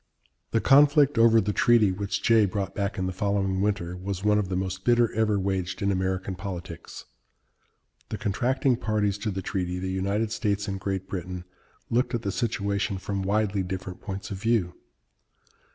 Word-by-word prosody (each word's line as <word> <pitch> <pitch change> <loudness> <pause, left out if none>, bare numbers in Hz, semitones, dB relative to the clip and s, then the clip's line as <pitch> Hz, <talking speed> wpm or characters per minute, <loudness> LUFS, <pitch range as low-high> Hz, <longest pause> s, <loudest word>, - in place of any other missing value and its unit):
The 115 - +1
conflict 145 -1 +5
over 115 0 +6
the 105 0 0
treaty 115 -4 +4
which 100 +1 -3
Jay 110 -3 +5
brought 95 0 -3
back 100 +2 -2
in 95 - -1
the 90 - -2
following 95 0 0
winter 100 -4 -1
was 95 +1 -5
one 105 0 +3
of 100 -3 -2
the 95 - -1
most 95 0 -3
bitter 120 -1 +3
ever 110 -2 +2
waged 95 -1 -2
in 100 0 +1
American 95 0 -1
politics. 90 -2 -7 1.0
The - - -3
contracting 125 +5 +1
parties 105 -3 0
to 105 - -2
the 95 -1 -4
treaty 90 -2 -2
the 95 +1 -3
United 100 +4 -1
States 105 -2 -1
and 95 -1 -3
Great 95 -1 -3
Britain 90 -1 -5 0.5
looked 120 +1 +1
at 115 - -3
the 100 - -1
situation 100 -3 -1
from 100 +1 -3
widely 100 0 +1
different 95 0 -5
points 100 0 -6
of 100 - -3
view. 110 -6 +1
100 Hz, 175 wpm, -26 LUFS, 95-110 Hz, 1.0 s, over